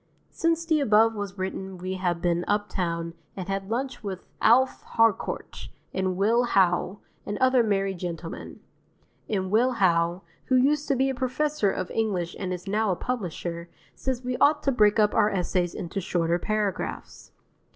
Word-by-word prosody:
Since 330 0 0
the 320 -2 +2
above 225 -4 +4
was 205 -2 -5
written 190 0 -4
we 185 +1 -4
have 175 -2 -2
been 175 0 +1
uptown 170 -5 -1 0.2
and 185 -1 -5
had 195 0 -3
lunch 245 +1 -3
with 190 -3 -5 0.2
Alf 260 +4 +4
Harcourt 225 -3 0 0.2
and 185 -1 -1
Will 220 +5 +3
Howe 190 -4 +2 0.3
and 205 - -4
other 255 -1 +4
merry 195 -3 +1
gentlemen; 170 -2 -7 0.7
and 190 -3 -1
Will 245 +4 +3
Howe, 175 -3 +2 0.2
who 260 - +2
used 285 +3 +3
to 280 - +2
be 265 +1 +2
a - - -3
professor 260 -2 0
of 185 -1 -3
English 190 -6 -1
and 185 -2 -3
is 180 0 -5
now 215 +2 +1
a 185 - +2
publisher, 175 -7 -4 0.2
says 260 -1 -3
we 250 0 -2
ought 295 +1 +4
to 275 - +2
break 210 -4 +4
up 210 -1 +3
our 210 - +4
essays 180 -2 -1
into 185 +3 -4
shorter 170 -1 0
paragraphs. 210 -1 -3
200 Hz, 165 wpm, -26 LUFS, 180-245 Hz, 0.7 s, above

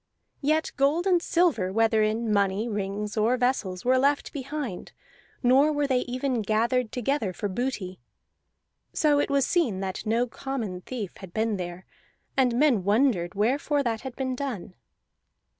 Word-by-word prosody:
Yet 310 +2 +1
gold 290 +6 +2
and 360 -3 +3
silver, 330 - +1
whether 225 +1 +3
in 215 +1 0
money, 200 +2 +1
rings, 205 0 -3
or 225 +3 +2
vessels, 245 -7 -1
were 255 +1 +4
left 280 +2 +1
behind, 280 - -5 0.5
nor 270 +5 +5
were 290 -1 0
they 260 -2 +2
even 250 0 -2
gathered 225 +3 +1
together 245 -5 -1
for 205 - -3
booty. 195 -3 -3 0.9
So 295 -2 +3
it - - 0
was 280 -1 +2
seen 270 - +1
that 190 -1 -4
no 230 +3 +1
common 230 -7 -5
thief 215 -3 -6
had 190 -3 -12
been 220 -1 0
there, 180 0 -6 0.5
and 255 -3 +3
men 255 -8 +3
wondered 205 -4 +2
wherefore 275 +7 +1
that 225 -3 -1
had 260 -2 -7
been 260 -1 -2
done. 245 -10 -5
240 Hz, 155 wpm, -26 LUFS, 205-275 Hz, 0.9 s, nor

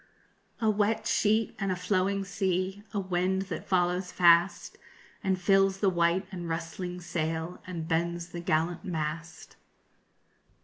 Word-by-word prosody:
A 225 - +1
wet 215 +1 +1
sheet 220 +1 +2
and 195 -2 0
a - - 0
flowing 190 +2 0
sea, 190 +1 -1
A 205 - -1
wind 185 0 0
that - - -6
follows 180 0 +1
fast 175 +1 +4 0.4
And 190 -1 +1
fills 195 +1 +3
the 195 -2 +3
white 170 +2 +2
and 175 -3 -5
rustling 170 +2 -4
sail 165 0 -3
_And 170 -3 -5
bends 170 +1 -1
the 175 - -6
gallant 170 +1 0
mast. 165 -1 -5
180 Hz, 135 wpm, -29 LUFS, 170-195 Hz, 0.4 s, fast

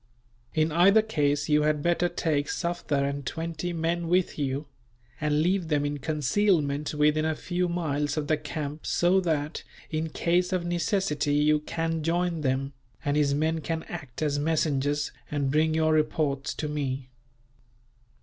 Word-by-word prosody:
In 155 0 +2
either 195 +7 +5
case, 145 -8 0
you 150 0 +4
had 150 -1 +1
better 175 +1 +2
take 150 -5 0
Sufder 155 -5 -1
and 140 0 -3
twenty 165 +5 -3
men 170 +1 -1
with 180 -1 +1
you; 140 +1 -1 0.5
and 150 0 +1
leave 180 0 +1
them 150 -2 +1
in 145 0 -2
concealment 150 0 +1
within 150 +1 +3
a 160 0 0
few 180 +2 -1
miles 150 -4 -1
of 150 - 0
the 155 - +2
camp 150 0 -5
so 180 +2 +3
that, 155 -4 -1 0.3
in 160 0 -1
case 175 +3 +1
of 180 -2 0
necessity, 175 -4 0
you 150 +1 +4
can 165 +1 -2
join 170 +1 0
them; 135 0 -1 0.3
and 145 0 +1
his 145 -2 +2
men 160 +2 0
can 160 +2 -3
act 145 -5 -6
as 145 -1 +1
messengers, 145 -2 0 0.2
and 140 -2 -1
bring 155 +2 +2
your 160 0 +3
reports 150 -3 0
to 150 - -3
me." 135 -3 -3
155 Hz, 160 wpm, -27 LUFS, 145-170 Hz, 0.5 s, either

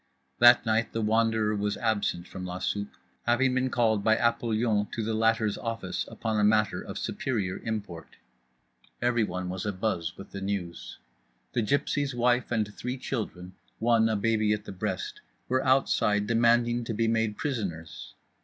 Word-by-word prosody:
That 120 +1 +7
night 115 +1 +1
The 115 - -1
Wanderer 110 -1 +2
was 105 0 -1
absent 105 -6 -1
from 95 - -8
la 90 0 -4
soupe, 100 +2 -3 0.3
having 125 +2 +3
been 130 0 +1
called 110 -4 +2
by 110 0 +4
Apollyon 115 -2 +1
to 115 - -2
the 110 +1 -1
latter's 110 -1 +1
office 115 -5 -3
upon 110 -1 -2
a - - +2
matter 105 0 +3
of - - -7
superior 100 -8 -2
import. 105 -7 -5 0.8
Everyone 105 -7 0
was 95 +1 -4
abuzz 95 -5 -2
with 95 - -11
the 100 - -6
news. 85 -10 -4 0.6
The - - +1
gypsy's 140 +3 0
wife 120 +1 +2
and 105 -3 0
three 125 +2 -4
children, 95 -8 -5 0.2
one 115 -1 +3
a 110 - +1
baby 110 0 +2
at 105 0 -4
the - - -7
breast, 95 - -4 0.3
were 130 +1 +1
outside 105 -6 +2
demanding 120 +1 +3
to 115 - -3
be 115 +1 +1
made 110 -2 0
prisoners. 85 - -4
110 Hz, 160 wpm, -28 LUFS, 100-120 Hz, 0.8 s, That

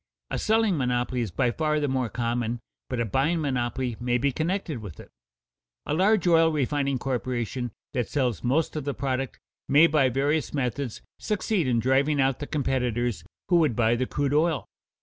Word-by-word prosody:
A - - -1
selling 220 -6 +2
monopoly 125 -1 0
is 115 - -2
by 120 +7 +1
far 150 +2 0
the 145 - 0
more 130 -3 0
common, 120 0 -2 0.3
but - - -2
a 115 - +1
buying 140 - +1
monopoly 125 -4 -1
may 120 0 +1
be 140 +3 +1
connected 160 -1 -2
with 100 -8 -9
it. - - -12 0.7
A - - -1
large 190 +3 +3
oil 165 -2 +5
refining 140 -2 0
corporation 125 -1 -2 0.2
that 125 -4 -1
sells 125 -7 -1
most 145 +7 +1
of 155 - -2
the 140 0 -3
product 135 -1 -2 0.3
may 150 +4 +7
by 145 -5 +3
various 145 +5 0
methods 130 -2 -2 0.2
succeed 210 - 0
in 120 -2 +2
driving 135 +5 +2
out 135 -1 +2
the 145 - -5
competitors 120 - -1 0.3
who 175 - +5
would 155 -8 +3
buy 115 -1 +3
the 130 +1 -1
crude 145 -1 -1
oil. 155 0 +2
135 Hz, 180 wpm, -26 LUFS, 120-150 Hz, 0.7 s, may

